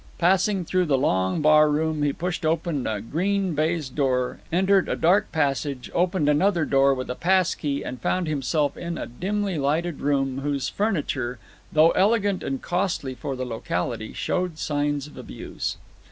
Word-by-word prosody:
Passing 190 +1 +2
through 185 +2 +1
the 140 -3 +3
long 95 - +1
barroom, 155 0 +4
he 145 -1 +2
pushed 175 +4 -3
open 160 -3 0
a 105 -2 -2
green 185 - -1
baize 155 0 0
door, 130 -2 -1
entered 190 +2 +3
a - - 0
dark 190 +5 +2
passage, 140 -3 -1
opened 175 -3 +1
another 170 +3 +3
door 135 0 +3
with 130 0 -5
a - - -1
passkey, 170 -4 +1
and 125 -2 -6
found 180 +5 0
himself 145 0 0
in 170 -1 -5
a - - -4
dimly 190 - -2
lighted 155 +3 0
room 135 -2 0
whose 140 -1 -1
furniture, 145 - -1 0.3
though 155 +2 +5
elegant 205 -1 +2
and 135 -1 -4
costly 175 -7 -1
for 135 +1 -5
the 130 0 -4
locality, 110 -1 -3
showed 180 -3 -2
signs 145 -2 -1
of 150 - -13
abuse. - - -5
155 Hz, 160 wpm, -24 LUFS, 135-180 Hz, 0.3 s, though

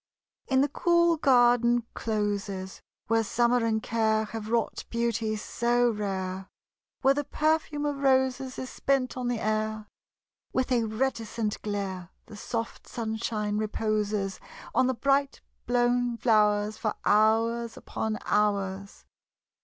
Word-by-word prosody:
In 265 -1 +3
the 285 - +3
cool 340 +3 +3
garden 240 -4 +4
closes, 205 -3 -3 0.2
Where 225 0 +2
summer 240 +2 +2
and 220 -1 0
care 220 -1 +1
Have 215 0 -6
wrought 230 -1 0
beauty 230 -2 -1
so 240 +2 +1
rare; 190 -3 -3 0.6
Where 270 +1 +6
the 290 +1 -1
perfume 305 0 0
of 290 -1 -1
roses 265 -1 +1
Is 260 - -5
spent 270 -2 0
on 250 -1 -3
the 245 -1 0
air; 215 0 -1 0.7
With 260 0 0
a 235 -2 +2
reticent 225 -2 -2
glare, 195 -4 -4 0.2
The 215 - -12
soft 230 +2 -5
sunshine 220 -2 -2
reposes 210 -2 -1 0.3
On 255 - +3
the 260 - 0
bright 275 +2 +1 0.3
blown 245 0 +1
flowers 210 -2 +2
For 215 -2 -1
hours 225 +2 +2
upon 220 -1 -3
hours. 200 -2 -1
225 Hz, 125 wpm, -28 LUFS, 210-250 Hz, 0.7 s, Where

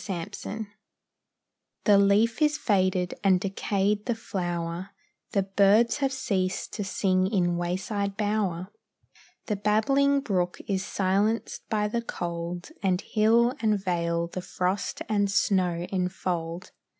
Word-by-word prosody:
THE 195 - -1 0.3
REAL 220 +1 -4 1.2
The 205 -2 +6
leaf 210 +6 +3
is 300 0 +3
faded, 185 -5 +1
and 190 -2 +4
decayed 200 +2 -1
the 240 - +1
flower, 175 -4 -3 0.4
The 195 - +2
birds 200 +4 +4
have 275 -2 0
ceased 190 -8 -2
to 210 - -3
sing 185 -1 +1
in 180 -4 +1
wayside 195 +3 -2
bower, 205 -4 -1 0.8
The 210 - -1
babbling 275 +8 +3
brook 180 -8 -1
is 195 -2 0
silenced 200 +5 -1
by 210 -2 +1
the 235 +3 -1
cold, 175 - -5
And 185 -3 +1
hill 230 +4 +3
and 215 -2 +2
vale 170 -3 0
the 175 +2 -6
frost 185 +2 -2
and 205 -2 +1
snow 185 -3 +1
enfold. 180 -2 -2
195 Hz, 125 wpm, -27 LUFS, 180-215 Hz, 1.2 s, The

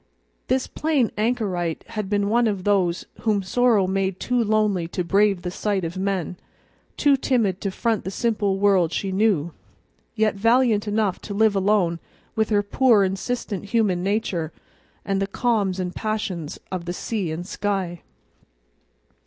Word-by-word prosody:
This 260 +1 +1
plain 300 -7 0
anchorite 205 -7 -1
had 215 -4 -4
been 205 -1 +1
one 235 +2 +3
of 200 -4 -2
those 185 -4 +1
whom 210 -3 +1
sorrow 225 0 +3
made 190 0 -1
too 245 -1 +1
lonely 210 -5 +1
to 180 +1 -3
brave 195 +1 +2
the 180 - -3
sight 200 0 -1
of 165 +2 -5
men, 190 -2 -2 0.6
too 285 -1 +4
timid 230 -8 0
to 200 - -1
front 225 +3 -1
the - - -4
simple 205 -2 0
world 195 -4 +3
she 195 +1 -2
knew, 190 -6 +1 0.6
yet 215 -1 +2
valiant 230 0 +2
enough 210 -2 0
to 200 - -6
live 215 0 +3
alone 190 -4 +2 0.4
with 220 -1 +1
her 205 -2 +2
poor 225 0 +4
insistent 195 +1 -3
human 205 -4 +1
nature 190 -5 -1 0.5
and 195 -1 0
the 195 - 0
calms 200 -4 0
and 180 -1 -3
passions 210 -8 -3
of 180 -2 -4
the 175 - -3
sea 195 -3 -3
and 165 +3 -5
sky. 190 -4 -2
200 Hz, 155 wpm, -23 LUFS, 185-220 Hz, 0.6 s, too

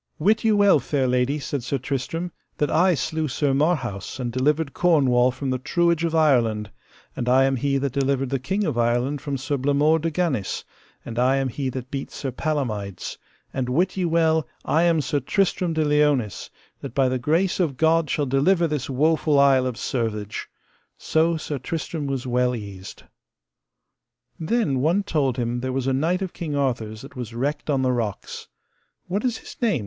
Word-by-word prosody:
Wit 215 +8 +2
you 220 -2 +3
well, 200 -6 +5
fair 135 +1 -1
lady, 125 +3 +1
said 145 -1 -3
Sir 125 +4 -2
Tristram, 140 +7 -3 0.3
that 150 - 0
I 180 +1 +4
slew 160 +1 -2
Sir 140 +1 0
Marhaus 135 - -1
and 120 -2 -2
delivered 140 +4 0
Cornwall 130 -8 +3
from 130 +1 -3
the 130 - -1
truage 170 +4 +1
of 165 -1 0
Ireland, 115 -9 +2 0.4
and 125 - -2
I 130 +1 +5
am 135 0 +2
he 140 +2 0
that 135 -2 -2
delivered 135 -1 0
the 135 - 0
King 190 +11 -1
of 150 -10 -1
Ireland 120 +4 +1
from 145 -2 -3
Sir 135 +2 -2
Blamore 145 +4 +3
de 165 +1 -1
Ganis, 155 - -1 0.4
and 115 0 -4
I 130 +2 +3
am 135 -1 0
he 135 +2 -3
that 130 0 -6
beat 135 -1 -4
Sir 135 - -5
Palamides; 115 - -3 0.3
and 130 -2 -2
wit 175 +9 +1
ye 190 - -1
well 160 -3 +2 0.2
I 160 - +2
am 170 -2 +3
Sir 145 +1 -1
Tristram 180 +3 0
de 155 -1 +1
Liones, 145 -9 +1 0.3
that - - -8
by 135 -2 +3
the 130 0 -1
grace 165 +9 +1
of 155 -8 0
God 160 0 +3
shall 145 - 0
deliver 165 +7 +3
this 150 -5 -2
woful 150 +2 +2
Isle 135 -2 +4
of 125 - -3
Servage. 110 -4 -3 0.5
So 160 +1 +1
Sir 150 -2 -4
Tristram 155 +1 -4
was 135 -2 -3
well 125 0 +1
eased. 100 -4 -9 1.4
Then 160 - 0
one 170 +8 +2
told 140 -9 0
him 120 0 -1
there 130 +1 -3
was 130 0 -2
a 135 - +1
knight 170 +8 +1
of 185 - -5
King 155 -4 -4
Arthur's 115 -6 -2
that 135 0 -12
was 120 -3 -6
wrecked 145 +5 -2
on 135 -2 +2
the 130 - +2
rocks. 115 -5 -4 0.6
What 195 +4 -2
is 245 -3 0
his - - -11
name? 215 - +2
140 Hz, 190 wpm, -23 LUFS, 125-160 Hz, 1.4 s, well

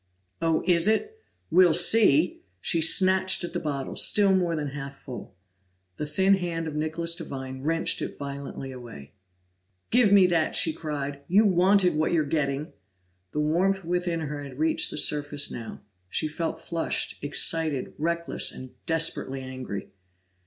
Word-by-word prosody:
"Oh, 165 -1 +1
it 175 -1 +3
is? 220 - +2 0.5
We'll 175 -1 +5
see!" 175 -3 +4 0.2
She 165 - +1
snatched 185 +3 +3
at 175 - -5
the - - -1
bottle, 140 -3 -4
still 200 -2 +4
more 175 -3 0
than 150 -2 -3
half 140 0 -7
full. 125 -7 -10 0.6
The 150 - -3
thin 190 +6 +3
hand 170 -3 -3
of 155 - -5
Nicholas 160 +2 -1
Devine 130 -6 -7
wrenched 165 +3 0
it - - -5
violently 140 -1 -7
away. 115 - -11 0.8
"Give 240 -3 +4
me 200 -2 +7
that!" 170 -3 +1
she 160 - +3
cried. 145 -3 -5
"You 205 +5 +4
wanted 185 0 +4
what 155 +2 0
you're 155 -3 +2
getting!" 145 0 -2 0.6
The 150 - -2
warmth 180 +5 +1
within 175 -1 -1
her 150 -1 -5
had 135 -2 -10
reached 160 +1 +2
the - - -5
surface 145 -1 +1
now; 115 -1 -8 0.3
she 155 - -1
felt 160 +1 -4
flushed, 165 0 -3
excited, 150 -1 0
reckless, 170 +2 0
and 130 -1 -10 0.2
desperately 160 -5 -1
angry. 130 -6 -7
160 Hz, 150 wpm, -26 LUFS, 140-175 Hz, 0.8 s, me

